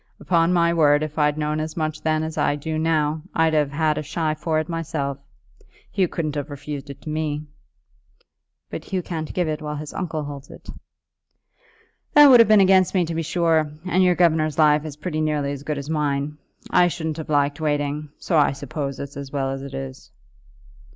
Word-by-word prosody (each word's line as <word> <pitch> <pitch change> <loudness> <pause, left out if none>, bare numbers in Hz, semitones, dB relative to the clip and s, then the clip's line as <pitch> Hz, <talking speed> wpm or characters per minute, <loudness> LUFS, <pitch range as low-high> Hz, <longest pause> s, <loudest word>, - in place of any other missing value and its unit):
Upon 170 -1 +2
my 170 -1 +3
word, 150 -2 +4
if 155 0 -5
I'd 150 0 +2
known 150 0 -1
as 155 +1 -4
much 155 -1 -2
then 155 0 +1
as 160 0 -4
I 145 - +1
do 155 +2 -3
now, 155 -1 +1
I'd 160 -1 +3
have 150 -2 +2
had 155 +1 +1
a - - -2
shy 155 +1 -1
for 155 +1 -1
it 155 0 -1
myself. 155 -5 -3 0.7
Hugh 190 -2 +2
couldn't 155 -3 -3
have 145 0 -4
refused 145 0 -7
it 140 0 -10
to 155 - -6
me." 155 -1 -2 1.3
"But - - -6
Hugh 185 -2 -2
can't 160 -3 -4
give 180 -2 -1
it 155 0 -3
while 150 0 -4
his 150 0 -7
uncle 160 -4 -3
holds 140 -1 -8
it." - - -14 1.5
"That 295 0 +10
would 245 - +9
have 230 - +6
been 215 -2 +7
against 190 0 +4
me 180 -2 +3
to 165 - -4
be 165 - -1
sure, 160 -2 +1 0.2
and 185 +1 +3
your 180 -1 +4
governor's 160 -3 +2
life 150 -1 +4
is 150 -2 -7
pretty 155 0 -3
nearly 150 -2 0
as 140 -1 -5
good 150 0 -3
as 140 0 -6
mine. 150 -1 -1 0.3
I 180 0 +5
shouldn't 160 -2 -3
have 160 - -7
liked 145 +1 +1
waiting; 145 0 -1
so 165 -4 +1
I 145 - +3
suppose 140 0 -5
it's 140 0 -7
as 140 -1 -7
well 135 -1 -1
as 135 0 -4
it 135 0 -7
is." 135 -1 -7
155 Hz, 205 wpm, -23 LUFS, 145-165 Hz, 1.5 s, That